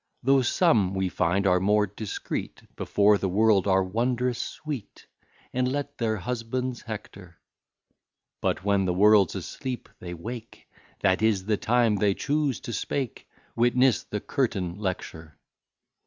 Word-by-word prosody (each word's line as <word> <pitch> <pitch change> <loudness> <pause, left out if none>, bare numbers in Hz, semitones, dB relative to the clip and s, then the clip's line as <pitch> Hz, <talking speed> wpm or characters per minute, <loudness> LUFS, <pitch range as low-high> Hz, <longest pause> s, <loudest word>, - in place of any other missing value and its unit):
Though 135 +1 +4
some, 115 - +2
we 95 -1 0
find, 90 +3 0
are 90 -1 +4
more 105 +2 +3
discreet, 105 +2 -5
Before 105 0 +3
the 95 - -1
world 105 0 +3
are 95 0 +4
wondrous 120 +5 -1
sweet, 145 -8 -7 0.5
And 125 0 +1
let 145 +1 -4
their 110 -2 0
husbands 125 +4 -3
hector: 100 -6 -9 1.0
But - - -1
when 100 -1 +2
the 90 -1 0
world's 105 -1 +5
asleep, 130 -2 -5
they 90 -1 -7
wake, 115 +7 -8 0.3
That 95 0 +2
is 105 -4 +2
the 105 0 +1
time 120 -1 +2
they 100 -1 +2
choose 145 -3 0
to 120 - -6
speak: 130 -2 -3 0.3
Witness 120 +1 +3
the 105 - -4
curtain 100 - -1
lecture. 80 -6 -5
105 Hz, 140 wpm, -26 LUFS, 95-125 Hz, 1.0 s, world's